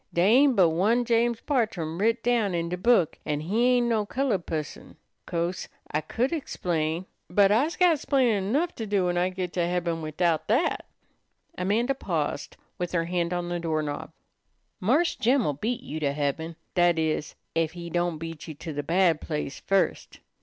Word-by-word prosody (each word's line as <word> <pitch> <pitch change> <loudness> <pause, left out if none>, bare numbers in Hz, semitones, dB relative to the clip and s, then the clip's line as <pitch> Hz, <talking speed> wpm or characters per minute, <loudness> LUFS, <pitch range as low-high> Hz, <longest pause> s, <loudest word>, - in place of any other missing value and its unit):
Dey 170 - +2
ain't 255 +7 +5
but 180 -5 +5
one 215 +9 +2
James 235 0 +1
Bartrum 195 - -1
writ 230 +3 +1
down 230 -6 +1
in 170 0 -1
de 180 - -1
book, 190 -4 +3
an' 150 -1 -2
he 210 +10 +1
ain't 245 -1 +2
no 225 -3 +1
colored 215 -5 -1
pusson.' 155 -2 -5 0.3
'Co'se 170 +2 -2 0.2
I 150 - 0
could 250 - -1
explain, 170 - -2 0.2
but 195 +2 +4
I's 275 +10 +2
got 350 -5 +4
'splainin' 235 -9 +1
'nough 325 +7 +1
to 225 - -4
do 200 -2 +1
when 175 0 0
I 180 +1 +2
git 185 -1 -4
to 175 -2 0
heaben 170 -2 -1
widout 155 +1 0
dat." 245 +10 +1 0.7
Amanda 220 +8 +1
paused 270 - -3 0.2
with 175 0 -3
her 165 -1 +1
hand 175 0 -1
on 175 -1 -2
the 175 0 -2
doorknob. 155 -3 -2 0.7
"Marse 280 - +2
Jim'll 240 - +2
beat 230 - -3
you 155 - -5
to 140 -2 0
heaben; 150 +3 -2 0.2
that 175 -2 +3
is, 155 -1 -1 0.2
ef 165 -1 +1
he 170 -1 -8
don't 175 -1 0
beat 165 0 -7
you 155 - -7
to 160 +2 -7
the 145 - -2
bad 170 +1 +2
place 150 -3 -4
first. 195 0 0
180 Hz, 180 wpm, -26 LUFS, 165-230 Hz, 0.7 s, ain't